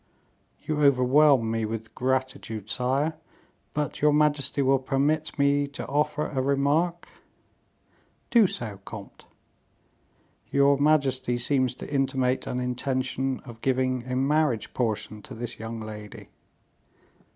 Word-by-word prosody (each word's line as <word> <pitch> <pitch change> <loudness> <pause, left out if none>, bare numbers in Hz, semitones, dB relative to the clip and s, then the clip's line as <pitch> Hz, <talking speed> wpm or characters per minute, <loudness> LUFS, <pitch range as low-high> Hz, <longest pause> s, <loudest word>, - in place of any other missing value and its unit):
"You 155 -1 -1
overwhelm 135 -2 +4
me 115 0 -1
with 110 0 -5
gratitude, 125 -5 -2
sire; 140 +5 0 0.6
but 150 -1 -2
your 150 0 +5
majesty 145 -2 +2
will 135 0 +3
permit 145 +4 0
me 140 0 +2
to 140 - -7
offer 150 +1 0
a 135 -3 -2
remark?" 145 +6 +1 1.2
"Do 230 -5 +6
so, 110 - -5
comte." 100 -1 -10 1.2
"Your 140 0 +4
majesty 135 -4 +2
seems 130 +1 +1
to - - -8
intimate 135 -2 0
an 125 - -2
intention 130 +1 -2
of 120 -3 -12
giving 130 -1 0
a - - 0
marriage 135 -3 +1
portion 110 -3 -2
to 125 - -10
this 120 +1 -6
young 115 +1 -5
lady." 105 -1 -9
130 Hz, 120 wpm, -26 LUFS, 120-145 Hz, 1.2 s, Do